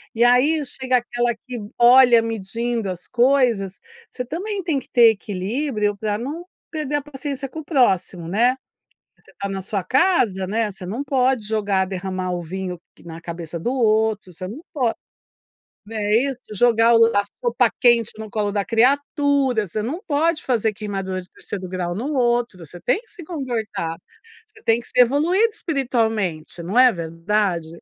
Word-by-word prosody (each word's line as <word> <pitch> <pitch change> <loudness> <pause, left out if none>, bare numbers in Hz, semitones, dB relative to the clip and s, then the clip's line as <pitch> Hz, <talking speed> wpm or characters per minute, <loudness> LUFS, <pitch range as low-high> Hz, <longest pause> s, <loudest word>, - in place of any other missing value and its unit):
E 230 - +3
aí 265 +6 +4
chega 255 -1 +1
aquela 240 0 -1
que 255 -2 -8 0.2
olha 245 -1 +7
medindo 225 0 -3
as 180 -1 -5
coisas, 240 -7 +2 0.3
você 250 - -5
também 380 - -4
tem 315 -5 0
que 260 - -16
ter 235 -2 +7
equilíbrio 210 +2 -2
pra 210 0 -1
não 295 +10 -5 0.3
perder 300 -3 -2
a 290 - 0
paciência 275 -1 -5
com 320 - -7
o 315 - -9
próximo, 190 - +1
né. 235 +8 +2 0.6
Você - - -22
tá 200 - -2
na 195 -1 -4
sua 195 0 -3
casa, 245 - +2
né, 215 +2 -1
você 185 -1 -10
não 225 +9 -3
pode 260 -5 +1
jogar 205 -3 +1
derramar 185 -1 -4
o 175 -1 -2
vinho 180 +1 -5 0.3
na 165 0 -8
cabeça 170 -1 -6
do 240 +10 -1
outro, 220 -5 +1
você 185 - -7
não 230 +11 -8
pode, 250 -7 0 0.9
né 210 -1 -2
isso? 270 -3 -3 0.2
Jogar 230 +1 +4
o - - +6
lá 230 -3 +5
o - - +4
a - - -9 0.3
sopa - - +2
quente 235 -3 +4
no 220 - -7
colo 205 -1 -1
da 200 -1 0
criatura, 270 0 +2
você 210 +5 -3
não 280 - -4
pode 315 +2 +1
fazer 225 -4 +1
queimadura 195 -2 -4
de 180 - -18
terceiro 190 -2 -7
grau 175 -1 -3
no 265 +9 -3
outro, 240 -5 +1
você 175 +4 -12
tem 250 - +1
que 465 - -26
se 375 -5 -11
comportar, 225 - -3 0.5
você 430 0 -20
tem 225 +1 +3
que - - -17
ser 250 - +4
evoluído 320 - +3
espiritualmente, 225 - -1
não 195 +8 -2
é 255 -1 +8
verdade? 170 +1 -1
230 Hz, 175 wpm, -22 LUFS, 195-265 Hz, 0.9 s, é